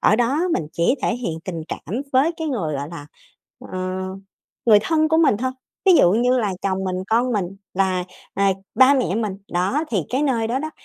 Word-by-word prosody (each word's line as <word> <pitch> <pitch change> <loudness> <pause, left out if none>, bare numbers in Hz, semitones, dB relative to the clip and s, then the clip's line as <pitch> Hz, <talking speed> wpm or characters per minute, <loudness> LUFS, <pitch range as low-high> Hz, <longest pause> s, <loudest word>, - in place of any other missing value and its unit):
ở 215 - +4
đó 250 +7 +1
mình 160 - -1
chỉ 170 +9 +2
thể 230 - +1
hiện 170 -10 -4
tình 170 -5 -4
cảm 215 - -4
với 275 +6 +3
cái 320 -1 -3
người, 170 - -2
gọi 140 +1 -4
là, 165 -4 -8 0.7
ờ, 185 - -3 0.9
người 215 -3 +8
thân 315 +5 +2
của 320 - +3
mình 315 -10 +4
thôi, 260 +2 -1 0.4
ví 375 - +8
dụ 180 - +6
như 245 +3 +3
là 210 -5 0
chồng 190 -1 -1
mình, 185 -1 -2
con 240 +3 +2
mình 200 -5 0 0.3
và, 185 -1 +1 0.3
à, 195 0 +3 0.2
ba 260 +2 +6
mẹ 255 -8 0
mình. 210 -3 -2 0.2
Đó, 195 - +1
thì 200 -7 +1
cái 265 +4 0
nơi 235 -6 +1
đó 250 - 0
đó, 310 +3 -4
225 Hz, 210 wpm, -22 LUFS, 185-260 Hz, 0.9 s, người